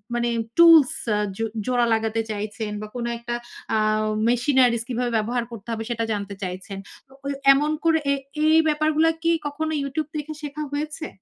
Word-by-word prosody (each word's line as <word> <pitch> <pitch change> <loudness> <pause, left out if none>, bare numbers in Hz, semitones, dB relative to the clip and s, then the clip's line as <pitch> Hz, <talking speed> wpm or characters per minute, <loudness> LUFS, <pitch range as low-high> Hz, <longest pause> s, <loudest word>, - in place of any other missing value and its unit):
মানে 240 0 0 0.3
tools 330 -5 +8 0.2
আ - - +1 0.2
জো 225 - -1 0.2
জোড়া 245 -1 +2
লাগাতে 225 0 0
চাইছেন 210 +1 -4
বা 215 - -6
কোনো 235 -1 -3
একটা 235 +1 -4 0.4
আ - - +3 0.5
machineries 245 -2 +3
কিভাবে 245 0 -1
ব্যবহার 235 +3 -1
করতে 225 -1 -10
হবে 225 0 -3
সেটা 230 -1 -1
জানতে 200 -1 -4
চাইছেন, 185 +2 -6 0.3
তো - - -28
ঐ - - -2 0.3
এমন 295 +3 +1
করে 325 -1 +4
এ - - +4 0.3
এই 315 +1 +6
ব্যাপারগুলা 310 +1 +2
কি 335 - +3 0.2
কখনো 315 +2 -3
YouTube 290 +2 -3
দেখে 300 +1 -5
শেখা 300 +1 -5
হয়েছে? 305 +2 -3
245 Hz, 170 wpm, -23 LUFS, 225-305 Hz, 0.5 s, tools